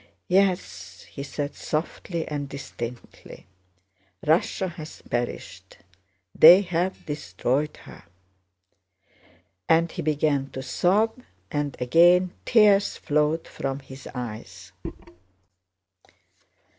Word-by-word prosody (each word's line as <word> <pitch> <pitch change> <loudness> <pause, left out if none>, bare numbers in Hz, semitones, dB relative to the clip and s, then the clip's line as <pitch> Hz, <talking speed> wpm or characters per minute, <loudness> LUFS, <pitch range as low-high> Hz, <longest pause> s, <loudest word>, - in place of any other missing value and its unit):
"Yes," 190 0 0
he 140 - -7
said, 145 +1 -4
softly 165 +1 -4
and 145 -2 -4
distinctly. 125 -3 -9 0.8
"Russia 170 +4 +1
has 155 -2 -10
perished. 120 0 -5 0.6
They've 180 +1 +5
destroyed 145 - -2
her." - - -14 1.6
And 165 +1 +3
he 175 - -5
began 145 -3 0
to 130 - -5
sob, 210 - +1 0.3
and 145 -2 -2
again 175 +7 +4
tears 205 -3 +4
flowed 150 +2 0
from 135 -1 -4
his 135 0 -12
eyes. 120 -3 -7
155 Hz, 85 wpm, -25 LUFS, 135-180 Hz, 1.6 s, They've